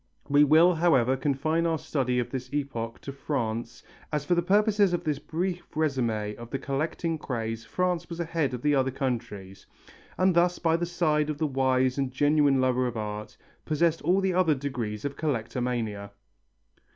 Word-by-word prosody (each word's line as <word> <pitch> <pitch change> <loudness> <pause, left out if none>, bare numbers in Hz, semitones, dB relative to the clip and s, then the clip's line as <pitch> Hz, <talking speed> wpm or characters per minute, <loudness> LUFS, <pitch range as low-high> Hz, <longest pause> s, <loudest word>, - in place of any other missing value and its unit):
We 145 +1 +5
will, 160 +5 +6
however, 135 -7 +3
confine 150 +5 0
our 165 -1 +1
study 130 -4 -1
of 120 0 -1
this 130 -1 -5
epoch 130 -6 -3
to 140 - -6
France 120 -4 -3 0.3
as 150 -2 -1
for 175 - +2
the 175 - +3
purposes 205 +1 +3
of 175 0 -1
this 150 -4 -1
brief 175 +4 -3
résumé 120 -9 -1
of 120 0 -9
the 135 - -2
collecting 155 +4 -2
craze 115 -4 -4
France 180 +5 -1
was 170 0 -6
ahead 160 -6 -1
of 125 - -9
the 150 0 +3
other 135 -1 +2
countries, 115 -8 -4 0.5
and 185 0 +3
thus 175 +1 +3
by 165 -1 +2
the 170 +1 -1
side 155 -3 +1
of 150 - -2
the 155 - 0
wise 130 -1 +1
and 135 -2 -1
genuine 145 0 +3
lover 130 -1 +2
of 120 -2 -4
art, 105 0 -5 0.3
possessed 165 +1 +1
all 180 +5 +2
the 190 -1 +1
other 175 -4 +3
degrees 125 -6 -4
of 140 -1 -3
Collectomania. 120 -6 -2
140 Hz, 175 wpm, -27 LUFS, 125-165 Hz, 0.5 s, will